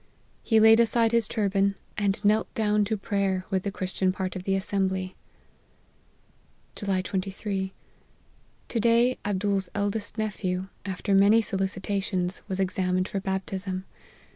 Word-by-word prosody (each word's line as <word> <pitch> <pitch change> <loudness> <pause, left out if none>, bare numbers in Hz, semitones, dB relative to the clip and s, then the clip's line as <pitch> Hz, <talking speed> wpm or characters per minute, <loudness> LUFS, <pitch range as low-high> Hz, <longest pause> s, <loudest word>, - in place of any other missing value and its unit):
He 225 -2 +3
laid 220 +1 +7
aside 230 0 +3
his 230 -3 +3
turban, 200 -2 +1 0.2
and 205 0 -1
knelt 215 +2 +3
down 210 -1 +2
to 215 +1 -1
prayer 195 -2 -1
with 190 -1 +1
the 200 - -2
Christian 190 -1 -1
part 185 -1 -4
of 185 0 -6
the 195 - +1
assembly. 190 -1 -1 0.8
" - - -37
July 195 -3 -1
23. 190 0 -3 1.0
To 235 - -1
day, 235 +3 +3
Abdool's 200 -2 0
eldest 205 +1 -2
nephew, 190 -3 -2 0.2
af 190 -2 -5
ter 200 - +1
many 200 +3 +6
solicitations, 190 -2 -2
was 190 -2 -3
examined 185 -1 0
for 195 - -2
baptism. 190 0 -3
195 Hz, 140 wpm, -27 LUFS, 190-210 Hz, 1.0 s, laid